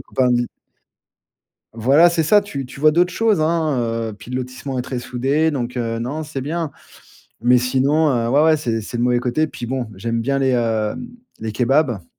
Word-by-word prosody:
copains 130 -1 0
de 120 - +3
mi 120 0 0 1.3
Voilà 135 +10 +5
c'est 165 -1 +1
ça. 205 +7 +5
Tu 140 -10 -6
tu 130 - -12
vois 155 - +6
d'autres 180 +2 +2
choses, 220 -6 +2
hein, 155 -2 +1 0.3
heu, - - -9
puis 115 +4 -12
le 125 - -2
lotissement 130 +1 -5
est 125 - -1
très 125 -1 -4
soudé 135 +6 0
donc, 125 -4 -4
heu, 115 -1 -2
non, 140 +7 -3
c'est 150 -3 -5
bien. 155 +3 -3 0.7
Mais, 125 +2 +4
sinon, 135 +5 +2
heu, 115 -2 0
ouais, 140 +5 +4
ouais 160 -1 +5
c'est 115 -6 -2
c'est 120 - -6
le - - 0
mauvais 125 0 +2
côté. 135 +5 0
Puis, 120 - -7
bon, 125 -1 -2
j'aime 115 +4 -2
bien 135 +4 0
les, 135 -1 +2
heu, 110 -3 0 0.5
les 110 -1 -4
kebabs. 125 - +1
130 Hz, 205 wpm, -20 LUFS, 120-155 Hz, 1.3 s, vois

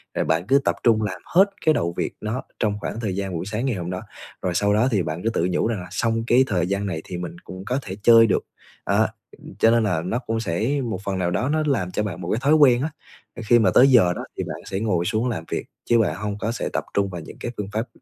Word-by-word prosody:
Rồi - - 0
bạn 80 +4 0
cứ 140 +1 +5
tập - - +2
trung 115 -2 +4
làm 95 -4 -3
hết 190 +3 +5 0.2
cái 155 - +5
đầu 85 - -1
việc - - -2
nó 110 +4 -3 0.2
trong 105 -1 0
khoảng 115 - -4
thời 105 -5 -2
gian 95 -1 -3
buổi 80 - -3
sáng 105 +5 -3
ngày 130 -4 0
hôm 90 -2 -4
đó, 90 - -4 0.4
rồi 90 -2 -2
sau 100 +2 +2
đó 110 +5 +3
thì 100 -5 +2
bạn 80 +3 -4
cứ 115 - +1
tự 90 -6 0
nhủ 90 - +1
rằng 115 -3 -2
là 90 - -8
xong 115 +2 0
cái 125 +2 +5
thời 90 -4 0
gian 100 +1 -1
này 80 -5 -3
thì 90 - -6
mình 85 -1 -6
cũng 95 +1 -9
có 125 +4 -1
thể 95 -6 -7
chơi 115 0 +7
được, 100 - 0 0.4
đó. - - +3 0.5
Cho 115 - +5
nên 115 -1 +3
là 90 -7 0
nó 95 +8 -2
cũng 115 -3 -3
sẽ 115 +8 -1
một 110 -5 -4
phần 100 -1 -1
nào 90 -1 0
đó 125 +10 0
nó 155 0 +1
làm 100 -11 0
cho 105 - -1
bạn 95 -4 -5
một 85 - -5
cái 110 - +1
thói 145 +3 +5
quen 130 -5 +5
á, 150 - -1 0.6
khi 120 +2 +5
mà 105 -5 +4
tới 130 - +7
giờ 110 -10 +5
đó - - -5
thì - - -1
bạn - - -5
sẽ 95 - -3
ngồi 95 -6 0
xuống 110 +7 0
làm 110 -9 -3
việc - - -2 0.2
chứ 120 -1 +5
bạn 110 - +1
hông 105 -1 -4
có 110 - -1
sẽ 115 - -3
tập - - -1
trung 100 -1 +1
vào 90 -3 -6
những - - -11
cái 120 - -4
phương 100 -2 -4
pháp 110 +3 -1
105 Hz, 285 wpm, -23 LUFS, 90-115 Hz, 0.6 s, chơi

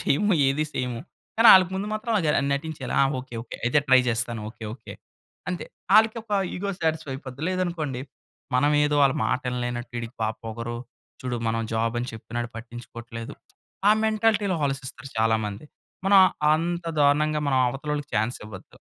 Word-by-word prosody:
చేయము 205 +7 +2
ఏది 140 +3 +1
సేయము. 125 -2 -3 0.4
కానీ 225 +1 +6
వాళ్ళకి 185 -1 +7
ముందు 195 +2 -2
మాత్రం 225 +2 -2
అది 160 - 0
ఆహ్, - - +2 0.2
నటించేయాలి 145 -3 -4
ఆ! - - +6 0.2
"Okay, 125 -2 -12
okay. 115 - -8
అయితే 125 +5 +3
ట్రై 130 -1 +7
చేస్తాను. 120 0 -1
ఓకే. 115 - -11
ఓకే." 115 - -11 0.6
అంతే. 180 - -4 0.3
వాళ్ళకి 220 +1 +6
ఒక 220 - -29 0.3
ఇగో 200 +2 -2
సాటిస్ఫై 160 -4 -1
అయిపోద్ది. 135 +1 -8
లేదనుకోండి 170 -8 -2 0.6
మనమేదో 150 +2 +3
వాళ్ళ 135 -1 +4
మాట 130 0 0
వినలేనట్టు 120 -1 -3
"వీడికి 115 +1 -5
బాగా 110 0 -1
పొగరు, 115 +1 -5 0.4
చూడు 125 -1 -2
మనం 115 0 0
జాబ్ 115 +1 0
అని 125 - -4
చెప్పినాడు 120 +1 -5
పట్టించుకోవట్లేదు." 115 0 -8 0.5
ఆ 210 - +8
మెంటాలిటీ‌లో 215 -4 +2
ఆలోచిస్తారు 135 -1 -5
చాలా 110 0 +3
మంది. 105 +8 -7 0.4
మనం 195 -1 +7 0.3
అంత 170 +2 -2 0.2
దారుణంగా 150 +1 +3
మనం 130 -1 +2
అవతల 135 +4 -7
వాళ్ళకి 145 -2 -5
చాన్స్ 110 +3 0
ఇవ్వొద్దు. 105 - -12
135 Hz, 160 wpm, -25 LUFS, 120-165 Hz, 0.6 s, ఆ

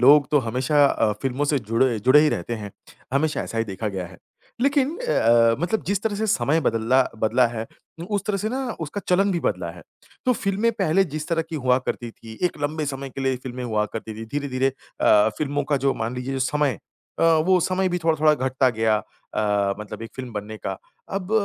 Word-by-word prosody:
लोग 140 +3 +6
तो 150 - +5
हमेशा 130 +5 +3
अ, 110 -5 +2
फ़िल्मों 135 +1 0
से 145 0 +2
जुड़े 115 +1 +1
जुड़े 130 +7 +6
ही 155 - +4
रहते 120 - -2
हैं, 105 -3 -6 0.4
हमेशा 150 +3 +1
ऐसा 115 - -5
ही 115 - +1
देखा 105 +1 -4
गया 95 -3 -4
है। 90 0 -14 0.4
लेकिन 280 +3 +2
अ - - +2
अ, 115 0 +4
मतलब 215 +6 0
जिस 200 +1 0
तरह 220 -2 0
से 220 +2 -1
समय 165 -6 +2
बदला 120 0 +3
बदला 115 +3 +3
है 115 -1 -5 0.3
उ - - -4
उस 200 - -3
तरह 210 - +1
से 210 +3 -2
ना 260 +4 -2 0.2
उसका 160 +6 -4
चलन 195 +2 +3
भी 170 - -1
बदला 90 - -1
है। 85 0 -12 0.4
तो 255 - +5
फ़िल्में 205 +1 0
पहले 195 -3 +2
जिस 155 0 -4
तरह 165 -1 +1
की 160 - -3
हुआ 125 -2 +2
करती 120 -1 -3
थी 110 0 -12
एक 175 - -6
लंबे 150 +1 -1
समय 135 -1 -4
के 135 - -7
लिए 135 -1 +1
फ़िल्में 125 -1 -5
हुआ 110 -3 0
करती 110 -1 -5
थी, 110 +1 -7
धीरे-धीरे 135 0 -1 0.3
अ, 105 0 +5
फ़िल्मों 145 -1 -1
का 145 0 +1
जो 135 - +3
मान 115 +2 -3
लीजिए 130 +2 -3
समय 135 -2 +1 0.4
अ, - - +1
वो 165 +3 +4
समय 185 +2 +1
भी 180 0 -1
थोड़ा-थोड़ा 155 -2 +3
घटता 130 -1 +1
गया 110 -1 +2 0.4
अ, 100 -2 +1
मतलब 105 +1 -7
एक 115 - -7
फ़िल्म 130 -2 -6
बनने 105 +1 -5
का, 95 -2 -4 0.3
अब 195 0 -4
135 Hz, 220 wpm, -23 LUFS, 115-160 Hz, 0.4 s, लोग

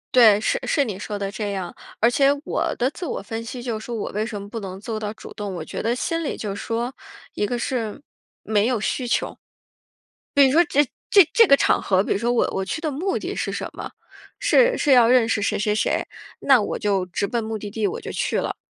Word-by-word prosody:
对， 220 -5 +7
是 215 - 0
是 285 - +2
你 200 -5 -5
说 210 -1 -4
的 200 0 -3
这 205 -1 -3
样。 185 -3 -5 0.2
而 230 - +5
且 275 +3 +4
我 - - -1
的 250 - +1
自 360 - -9
我 - - -3
分 225 +3 -6
析 240 +1 -7
就 230 -3 -3
是 - - -10
说 240 - -4
我 215 - -4
为 210 +2 -1
什 220 -2 -5
么 200 - -8
不 225 +3 -6
能 190 -2 -7
做 215 0 -4
到 210 -1 -3
主 220 - -11
动， 200 -3 -5
我 - - -5
觉 - - -5
得 230 +2 0
心 330 +6 -2
里 285 - -3
就 200 -2 -4
说， 235 +5 -3 0.4
一 205 - -1
个 245 - -2
是 235 -3 -3 0.4
没 215 +1 +2
有 245 -4 0
需 245 +4 -2
求。 - - -1 1.0
比 280 -1 +6
如 265 - +3
说 325 +5 +6
这 290 -1 +3 0.3
这 395 -3 +8
这 455 -2 +6
个 275 - +7
场 - - +2
合， 190 -1 +2
比 - - -4
如 - - +2
说 235 +3 0
我 240 - +2
我 190 - -2
去 315 - -4
的 310 - -1
目 360 +8 -1
的 - - -4
是 - - -3
什 - - -4
么？ - - -7 0.5
是 - - +4
是 290 - +1
要 245 -3 +7
认 240 -2 +4
识 215 - +1
谁 - - 0
谁 210 0 0
谁， 215 - 0 0.4
那 265 -5 +5
我 - - -2
就 195 -3 0
直 180 +3 -2
奔 235 +4 -1
目 220 0 -4
的 205 -1 -7
地， 215 -1 0
我 - - -4
就 - - -6
去 - - -1
了， - - -3
225 Hz, 270 characters per minute, -23 LUFS, 205-255 Hz, 1.0 s, 这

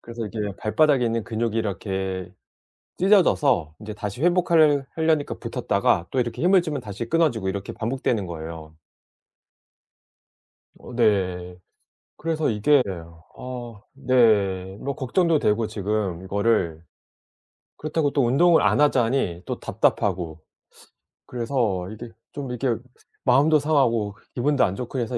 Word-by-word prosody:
그래서 115 -1 -6
이게 110 +1 -7
왜 105 -1 -2
발바닥에 140 +3 +2
있는 115 -1 -1
근육이 115 0 -2
이렇게 95 -3 -3 0.7
찢어져서 145 - +3
이제 105 0 -6
다시 105 +4 -6
회복하려 165 -5 +4
하려니까 160 -2 +1
붙었다가 85 - 0
또 130 - 0
이렇게 120 0 -2
힘을 185 +1 +5
주면 155 -4 -4
다시 105 +2 -6
끊어지고 145 -13 +1
이렇게 100 0 -5
반복되는 115 -3 -1
거예요. 80 -1 -8 2.0
어 - - -11
네. 90 -6 0 0.6
그래서 160 -3 -1
이게 125 +6 +3 0.5
어 120 -4 -8
네 105 -8 +2
뭐 140 +1 -3
걱정도 160 +5 +1
되고 105 -1 +1
지금 105 -4 -2
이거를 100 -4 0 1.0
그렇다고 155 -1 -1
또 140 -3 +2
운동을 165 +8 +4
안 - - +3
하자니 120 -10 +1
또 - - -4
답답하고. 85 -5 -1 0.8
그래서 115 -7 -1
이게 115 +2 -8 0.2
좀 140 -3 -6
이렇게 125 -1 -1 0.4
마음도 145 +4 +4
상하고 120 -9 +1 0.2
기분도 140 +2 +2
안 95 - -2
좋고 125 +4 -4
해서 120 +1 -2
115 Hz, 290 characters per minute, -24 LUFS, 100-140 Hz, 2.0 s, 힘을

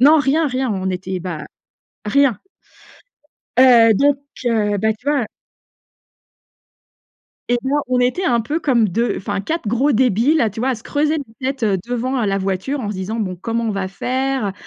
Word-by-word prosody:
non, 300 +4 +7
rien, 295 +3 +2
rien 255 0 -1
on 190 -1 -2
était, 185 0 -4
bah, 170 -4 -5 0.6
rien. 270 +1 +3 1.2
Heu, 235 -3 +7
donc, 280 +5 +3 0.3
heu, 210 -3 +1
bah, 220 +2 +2
tu 220 - -26
vois 280 -6 +1 2.2
Et 245 - +3
bien, 275 +2 +1
on 255 -1 +1
était 250 +10 +1
un 235 -2 +2
peu 300 +8 -2
comme 240 -8 +2
2, 230 +6 0
enfin 200 0 -3
4 315 - -3
gros 240 +7 +2
débiles, 250 +4 +3
là, 230 - +3
tu 210 +2 -7
vois, 260 +2 +1
à 255 - 0
se 220 - -14
creuser 300 +2 0 0.2
la 260 +1 0
tête, 265 - -19
heu, 200 -2 +2
devant 245 +1 -1
heu, - - 0
la 195 0 0
voiture 195 +9 -2
en 210 - -4
se 210 - -3
disant: 190 +4 -4
«Bon, 185 -4 -2
comment 230 +5 -3
on 225 - 0
va 195 -2 -2
faire? 260 +3 -1
Heu, 195 - -2
235 Hz, 190 wpm, -19 LUFS, 205-270 Hz, 2.2 s, non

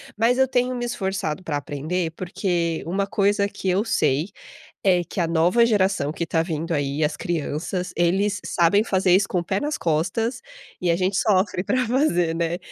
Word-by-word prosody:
Mas 235 +4 +2
eu 265 - +4
tenho 250 0 0
me 240 -1 -3
esforçado 190 -7 -3
pra 150 -4 -2
aprender, 155 +5 -3
porque 175 -1 -2
uma 195 +4 -1
coisa 200 0 +1
que 195 - -6
eu 185 +3 +2
sei 155 - +1 0.6
é 180 -2 +4
que 180 - -5
a 170 - +2
nova 175 +8 +3
geração 190 -9 +1
que 170 - -5
está 165 -1 0
vindo 165 0 -3
aí, 145 0 0
as 150 - -1
crianças, 175 +2 -3
eles 195 +4 +1
sabem 175 +4 +3
fazer 190 -3 +2
isso 195 +1 +4
com 180 - 0
o - - -7
pé 195 +3 -1
nas 295 +1 -2
costas, 195 +10 -1 0.4
e 175 -1 +1
a 170 - +3
gente 185 +2 0
sofre 190 -3 +2
pra 255 +3 0
fazer, 200 - +1
né. 170 +1 -1
185 Hz, 190 wpm, -23 LUFS, 165-205 Hz, 0.6 s, eu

